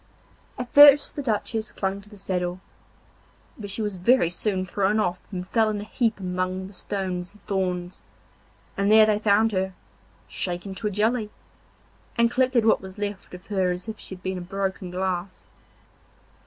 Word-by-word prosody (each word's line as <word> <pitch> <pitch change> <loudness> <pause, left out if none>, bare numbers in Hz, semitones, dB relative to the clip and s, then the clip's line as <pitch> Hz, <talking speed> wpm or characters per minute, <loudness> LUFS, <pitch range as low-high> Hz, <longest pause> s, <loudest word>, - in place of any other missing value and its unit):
At 250 -1 -6
first 290 0 +8
the 290 - -3
Duchess 220 -2 -2
clung 195 0 -3
to 205 - -18
the 210 - -13
saddle, 180 -2 -2 1.0
but 205 -3 -8
she 215 +3 -3
was 205 -3 -3
very 180 -2 +3
soon 185 0 0
thrown 200 +3 +1
off 180 -3 0
and 180 -1 -5
fell 220 0 +2
in 210 -1 -2
a - - -5
heap 225 0 -1
among 185 0 -2
the 195 - -11
stones 185 -2 -3
and 210 - -23
thorns, 180 -2 -2 0.7
and 200 +1 +1
there 220 0 +8
they 210 -1 +2
found 215 +1 +3
her, 190 -1 -1 0.5
shaken 180 +2 -4
to 210 +3 -3
a - - +1
jelly, 215 +2 0 0.9
and 235 0 +4
collected 255 -2 +2
what 225 - +4
was 190 +1 -10
left 205 -1 -5
of 180 - -13
her 190 -3 0
as 180 +3 -4
if 220 -1 -6
she 190 - -8
had 185 - -18
been 185 -1 -2
a - - -7
broken 190 0 -3
glass. 185 0 -3
195 Hz, 180 wpm, -25 LUFS, 185-215 Hz, 1.0 s, first